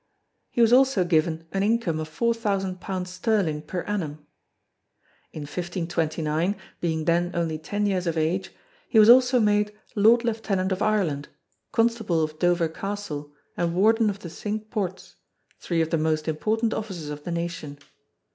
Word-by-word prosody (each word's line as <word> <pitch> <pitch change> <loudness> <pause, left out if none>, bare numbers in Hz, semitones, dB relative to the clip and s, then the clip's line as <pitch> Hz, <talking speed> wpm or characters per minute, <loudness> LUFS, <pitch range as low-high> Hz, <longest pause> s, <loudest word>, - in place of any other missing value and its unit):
He 240 - 0
was 230 0 +5
also 260 -6 +5
given 165 -1 +1
an 195 - -1
income 205 -6 +1
of 155 - -4
four 235 +10 0
thousand 195 -5 -2
pounds 185 -1 -4
sterling 185 -5 0
per 175 +4 -4
annum. 155 -8 -4 1.1
In 155 - -7
1529, 165 +1 -1 0.2
being 160 -2 -1
then 175 +1 +2
only 165 -2 -1
ten 205 +7 -2
years 185 -3 0
of 165 -1 -1
age, 165 +4 0 0.4
he 225 - +2
was 215 +1 +9
also 250 0 +6
made 210 -1 +2 0.2
Lord 225 +3 +5
Lieutenant 205 -5 -1
of 190 +1 -1
Ireland, 175 -10 +1 0.4
Constable 225 -8 +1
of 155 0 -4
Dover 175 -1 +2
Castle 160 -4 -5 0.2
and 170 -1 -1
Warden 220 +3 +4
of 200 - -3
the 180 -4 -9
Cinque 215 +3 -5
Ports 190 -4 -4 0.4
three 170 -2 0
of 160 - -1
the 165 - +2
most 155 0 0
important 220 +8 0
offices 180 -9 -5
of 145 0 -7
the 175 - -5
Nation. 170 -4 -4
185 Hz, 160 wpm, -25 LUFS, 160-210 Hz, 1.1 s, was